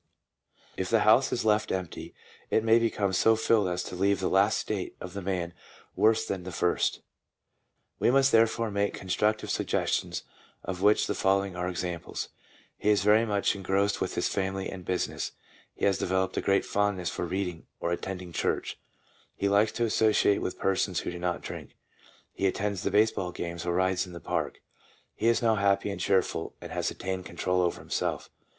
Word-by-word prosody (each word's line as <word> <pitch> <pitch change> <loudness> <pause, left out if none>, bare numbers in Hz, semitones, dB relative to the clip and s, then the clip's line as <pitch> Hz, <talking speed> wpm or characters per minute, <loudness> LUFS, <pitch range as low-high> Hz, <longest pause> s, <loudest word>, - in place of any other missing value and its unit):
If 95 - -2
the 115 -2 +3
house 110 +6 +5
is 120 -2 -1
left 105 0 +2
empty, 95 -3 -5 0.3
it 110 - +2
may 115 +1 +5
become 105 -4 0
so 110 +4 +4
filled 110 -2 +2
as 90 0 -2
to - - -7
leave 100 +1 +2
the 95 - -1
last 100 +3 +4
state 100 -4 -3
of 90 - -8
the 100 - -5
man 90 -2 -2 0.4
worse 110 +1 +3
than 95 -2 -3
the 90 +1 -7
first. 90 0 0 1.0
We - - +3
must 135 +1 +4
therefore 115 0 +3
make 100 0 0
constructive 105 +4 0
sug - - -1
gestions, - - -1 0.4
of 90 -1 -5
which 105 +1 +4
the - - -1
following 95 -1 +1
are 90 0 -2
examples: 90 -2 -4 0.2
— - - -30
He 105 - +1
is 105 -3 +3
very 110 +2 +4
much 100 -2 +1
engrossed 100 +1 0
with - - -2
his - - +1
family 95 0 -2
and 95 -2 -8
business, 90 0 -2 0.4
he - - -1
has 100 -1 +2
developed 95 0 0
a - - 0
great 100 0 +2
fondness 100 -4 0
for - - -4
reading 90 -2 -3
or 85 - -1
attending 90 0 -4
church, - - -1 0.6
he 100 - 0
likes 100 +2 +3
to 120 - 0
associate 110 -2 +3
with 90 - -3
persons 95 -1 0
who - - -4
do 90 - -7
not 90 0 -1
drink, - - -8 0.6
he 95 - 0
attends 100 0 -1
the - - 0
baseball 105 -3 +2
games 85 0 -5
or 85 - +1
rides 95 0 +1
in 90 - -11
the 85 - -7
park. - - -3 0.5
He 115 - -1
is 115 +1 +3
now 110 -2 +3
happy 100 0 +2
and 100 - -5
cheerful, 95 -1 0
and - - -9
has - - -1
attained 95 -1 -4
control 90 +2 0
over 90 -1 0
himself. - - -3
95 Hz, 190 wpm, -28 LUFS, 90-105 Hz, 1.0 s, house